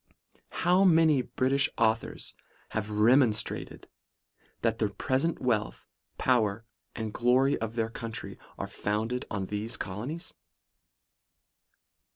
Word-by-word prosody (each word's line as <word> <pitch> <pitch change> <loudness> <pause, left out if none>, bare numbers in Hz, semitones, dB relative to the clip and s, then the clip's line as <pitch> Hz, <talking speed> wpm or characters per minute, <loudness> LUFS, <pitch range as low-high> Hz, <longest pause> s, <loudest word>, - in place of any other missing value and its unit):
' - - -35 0.2
How 180 +2 +5
many 160 -6 +5
British 135 +2 +1
authors 115 0 0 0.4
have 110 -1 -3
demonstrated, 110 +1 +2 0.8
that - - +1
the - - +1
present 135 +6 -1
wealth, 110 - -1 0.3
power 115 -4 +1 0.3
and 110 -2 -4
glory 130 +3 +3
of 115 0 -4
their 115 -1 -1
country, 115 -1 -6 0.2
are - - -3
founded 110 +4 -2
upon 100 -2 -3
these 105 +4 -4
colonies 120 - -5
115 Hz, 110 wpm, -29 LUFS, 110-135 Hz, 0.8 s, How